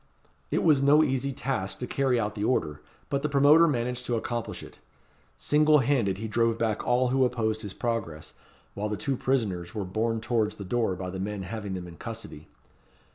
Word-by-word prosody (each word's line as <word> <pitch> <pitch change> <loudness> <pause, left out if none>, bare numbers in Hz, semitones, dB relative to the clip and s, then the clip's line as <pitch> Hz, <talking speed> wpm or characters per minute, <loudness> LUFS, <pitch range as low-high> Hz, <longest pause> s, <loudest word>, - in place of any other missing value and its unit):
It - - 0
was 150 -5 +4
no 145 +3 +6
easy 135 -1 0
task 125 -8 -3
to 125 - -4
carry 130 -1 +1
out 105 -1 -1
the 105 - -4
order; 80 - 0 0.3
but 140 -1 0
the 150 - -1
promoter 145 +4 +6
managed 125 -3 -1
to 120 - 0
accomplish 115 0 -4
it. - - -13 0.6
Single 150 +1 +4
handed 120 -8 +1
he 110 +2 -4
drove 115 +1 +1
back 110 -2 -1
all 125 +1 +2
who 130 +1 +3
opposed 110 -3 0
his 100 -2 -7
progress, 100 -11 -3 0.4
while 105 +1 -3
the 105 - -2
two 135 +5 -1
prisoners 110 -10 -1
were 105 -3 -2
borne 110 +4 -1
towards 110 -2 0
the 100 - -8
door 110 -1 0
by 90 0 -5
the 95 - -6
men 100 0 -3
having 100 0 -5
them 90 -1 -6
in 85 -1 -12
custody. 75 0 -8
115 Hz, 195 wpm, -27 LUFS, 100-130 Hz, 0.6 s, no